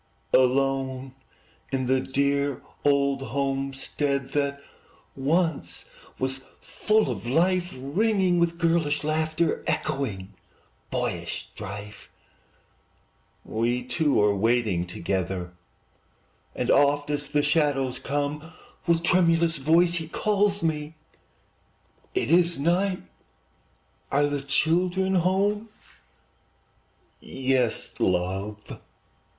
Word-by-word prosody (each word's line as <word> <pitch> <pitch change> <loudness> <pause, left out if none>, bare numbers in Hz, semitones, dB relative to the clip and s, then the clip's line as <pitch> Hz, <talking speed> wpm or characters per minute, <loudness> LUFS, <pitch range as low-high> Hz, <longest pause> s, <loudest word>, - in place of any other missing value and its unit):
Alone 130 0 +2 0.6
in 130 -1 0
the 130 +1 +2
dear 140 0 0 0.2
old 140 -1 +2
homestead 135 0 -2
That 140 -1 0 0.6
once 160 +3 0 0.3
was 130 0 -2 0.2
full 215 0 +1
of - - -6
life, 175 +6 +2
Ringing 185 - +1
with 170 0 +1
girlish 165 -3 +1
laughter, 155 +1 0
Echoing 100 -8 -2 0.6
boyish - - -3
strife, 105 0 -8 1.4
We 120 +3 -1
two 150 +3 +1
are 105 -1 +3
waiting 105 -4 +1
together; 90 0 -3 1.0
And - - 0
oft, 145 +1 +3
as 145 -1 -1
the 145 +1 +1
shadows 145 -4 +1
come, 145 +3 -3 0.3
With 170 -1 +3
tremulous 170 -2 +3
voice 165 +5 +3
he 165 -2 -2
calls 205 +2 +1
me, 155 -1 -2 1.2
"It 130 - 0
is 170 0 +4
night! 180 +6 +1 1.1
are 145 +1 +3
the 145 -1 -1
children 180 +7 +1
home?" 195 +4 +1 1.5
"Yes, 130 -3 -1
love!" 95 +4 -2
145 Hz, 90 wpm, -26 LUFS, 130-170 Hz, 1.5 s, is